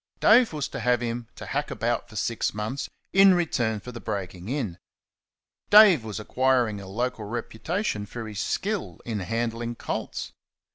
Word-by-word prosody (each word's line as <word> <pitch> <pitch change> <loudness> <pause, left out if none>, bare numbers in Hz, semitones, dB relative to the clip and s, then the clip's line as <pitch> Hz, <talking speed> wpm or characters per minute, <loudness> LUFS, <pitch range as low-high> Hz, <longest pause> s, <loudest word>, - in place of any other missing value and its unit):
Dave 235 +2 +6
was 150 -3 -2
to - - -5
have 125 -1 +2
him 120 -1 -3
to - - -8
hack - - -2
about - - -1
for - - -13
six - - -1
months 110 +6 -3 0.2
in 195 -1 +7
return 120 -11 0
for 125 - -9
the 120 - -8
breaking 95 -3 -5
in. 120 - -3 0.9
Dave 205 - +8
was 110 -1 -5
acquiring 125 -2 +1
a 95 - -9
local 115 +2 -2
reputation 115 - -3
for 115 0 -6
his 105 -3 -6
skill 205 - -2
in 110 -3 -2
handling 115 +3 -2
colts. - - -4
120 Hz, 160 wpm, -26 LUFS, 105-140 Hz, 0.9 s, Dave